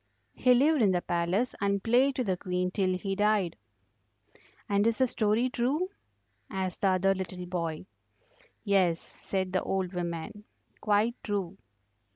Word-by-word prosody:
"He 250 Hz, -1 st, +4 dB
lived 290 Hz, +3 st, +4 dB
in 200 Hz, -4 st, +4 dB
the 180 Hz, -, 0 dB
palace 175 Hz, +8 st, 0 dB
and 200 Hz, -1 st, 0 dB
played 255 Hz, +4 st, +3 dB
to 255 Hz, -, 0 dB
the 190 Hz, -5 st, 0 dB
Queen 180 Hz, 0 st, -2 dB
till 185 Hz, -2 st, 0 dB
he 195 Hz, +1 st, -3 dB
died." 205 Hz, -4 st, +1 dB, 1.1 s
"And 200 Hz, +1 st, +2 dB
is 230 Hz, -, +1 dB
the 260 Hz, -, +4 dB
story 225 Hz, 0 st, +1 dB
true?" 270 Hz, +9 st, 0 dB, 0.6 s
asked 190 Hz, -1 st, -3 dB
the 200 Hz, -, +3 dB
other 190 Hz, +1 st, +3 dB
little 185 Hz, -1 st, -5 dB
boy. 170 Hz, -2 st, -3 dB, 0.8 s
"Yes," 185 Hz, -5 st, +2 dB
said 190 Hz, -1 st, -4 dB
the 185 Hz, -, +2 dB
old 190 Hz, -1 st, -2 dB
woman, 175 Hz, +3 st, -4 dB, 0.4 s
"quite 215 Hz, +2 st, +2 dB
true." 200 Hz, -4 st, -3 dB
195 Hz, 150 wpm, -29 LUFS, 180-225 Hz, 1.1 s, He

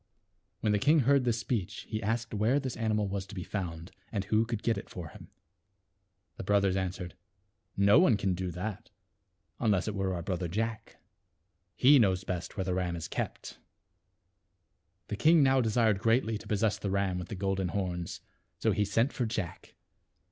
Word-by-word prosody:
When 110 Hz, -, +2 dB
the 105 Hz, -, +2 dB
king 150 Hz, +7 st, +4 dB
heard 135 Hz, 0 st, +3 dB
this 120 Hz, -2 st, +1 dB
speech 110 Hz, -5 st, -3 dB
he 110 Hz, -1 st, -5 dB
asked 115 Hz, +3 st, -2 dB
where 110 Hz, +7 st, +2 dB
this 130 Hz, -3 st, -4 dB
animal 110 Hz, -2 st, 0 dB
was 95 Hz, 0 st, -4 dB
to 100 Hz, -, -10 dB
be 90 Hz, -, -4 dB
found, 85 Hz, -4 st, -5 dB, 0.2 s
and 100 Hz, -5 st, -1 dB
who 110 Hz, +2 st, +2 dB
could 115 Hz, -3 st, -3 dB
get 115 Hz, -, +2 dB
it -, -, -7 dB
for 85 Hz, -4 st, -7 dB
him. -, -, -13 dB, 1.1 s
The -, -, -5 dB
brothers 100 Hz, -1 st, +2 dB
answered, 95 Hz, -1 st, -3 dB, 0.4 s
" -, -, -52 dB, 0.2 s
No 100 Hz, +7 st, +6 dB
one 135 Hz, -, +5 dB
can 95 Hz, -2 st, 0 dB
do 90 Hz, 0 st, -3 dB
that, 90 Hz, +4 st, -5 dB, 0.7 s
unless 100 Hz, -4 st, +1 dB
it 105 Hz, -, -1 dB
were 95 Hz, -2 st, -1 dB
our 85 Hz, -, -4 dB
brother 90 Hz, 0 st, -2 dB
Jack. 115 Hz, +5 st, -3 dB, 0.8 s
He 140 Hz, +2 st, +6 dB
knows 95 Hz, -4 st, +2 dB
best 90 Hz, -3 st, -5 dB
where 95 Hz, -, 0 dB
the 90 Hz, -1 st, -1 dB
ram 90 Hz, -1 st, -1 dB
is 85 Hz, -, -5 dB
kept." -, -, -5 dB, 1.5 s
The 105 Hz, -, -2 dB
king 160 Hz, +6 st, +5 dB
now 135 Hz, -1 st, +4 dB
desired 110 Hz, -3 st, +2 dB
greatly 115 Hz, +1 st, +2 dB
to -, -, -12 dB
possess 105 Hz, 0 st, +1 dB
the 100 Hz, -, -3 dB
ram 95 Hz, -2 st, 0 dB
with 90 Hz, -, -6 dB
the 100 Hz, -, -6 dB
golden 95 Hz, -1 st, -1 dB
horns, 90 Hz, -2 st, -3 dB, 0.4 s
so -, -, +1 dB
he 105 Hz, -, +1 dB
sent 115 Hz, +7 st, +1 dB
for 125 Hz, -4 st, -1 dB
J 110 Hz, -2 st, -1 dB
ack. 85 Hz, -, -13 dB
100 Hz, 190 wpm, -30 LUFS, 95-115 Hz, 1.5 s, No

